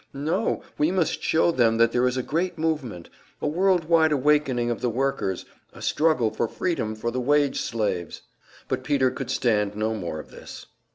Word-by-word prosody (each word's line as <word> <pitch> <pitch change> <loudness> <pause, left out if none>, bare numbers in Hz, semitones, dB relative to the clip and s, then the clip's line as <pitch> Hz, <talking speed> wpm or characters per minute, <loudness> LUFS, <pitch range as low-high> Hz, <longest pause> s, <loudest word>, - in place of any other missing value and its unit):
No, 165 +10 -1 0.2
we 150 - +3
must 180 -3 0
show 165 +2 +2
them 115 -6 +2
that 115 0 +4
there 125 +1 +2
is 125 +1 -1
a 130 - -1
great 170 +7 -2
movement, 150 - -2 0.3
a - - -4
world 175 +2 +2
wide 160 -1 +4
awakening 135 -4 +2
of 120 - -4
the 125 - +1
workers, 125 -6 -1 0.3
a - - -13
struggle 150 -8 +2
for - - -1
freedom 110 -8 -2
for 115 +2 -3
the 125 +1 -2
wage 145 +2 +2
slaves 100 -7 -3 0.2
" - - -25
But - - -2
Peter 135 -3 +2
could 130 -1 -6
stand 105 -6 +1
no 110 +1 -1
more 85 -7 -4
of - - -11
this. - - -11
130 Hz, 190 wpm, -25 LUFS, 115-155 Hz, 0.3 s, that